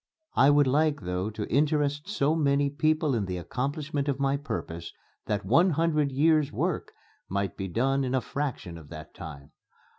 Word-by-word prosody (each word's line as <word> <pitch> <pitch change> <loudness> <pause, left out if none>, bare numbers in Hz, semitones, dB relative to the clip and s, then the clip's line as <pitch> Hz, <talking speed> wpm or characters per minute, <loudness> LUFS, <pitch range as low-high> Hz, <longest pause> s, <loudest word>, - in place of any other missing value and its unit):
I 135 - +5
would 145 0 +5
like 150 +3 +2
though 90 +2 -2
to 110 -1 -5
interest 145 - +1
so 155 -8 +1
many 140 -2 +2
people 155 0 +1
in 110 -4 0
the 90 -1 -3
accomplishment 140 - -3
of 140 -1 -1
my 135 0 +2
purpose 85 - -5 0.4
that 105 -2 -1
one 165 - +5
hundred 155 -3 +1
years' 150 +1 +3
work - - -2 0.4
might 100 0 -1
be 95 - -4
done 135 +8 +1
in 130 0 0
a 130 - +2
fraction 120 - -4
of 75 -2 -15
that - - -10
time. 75 -3 -10
140 Hz, 175 wpm, -28 LUFS, 100-150 Hz, 0.4 s, I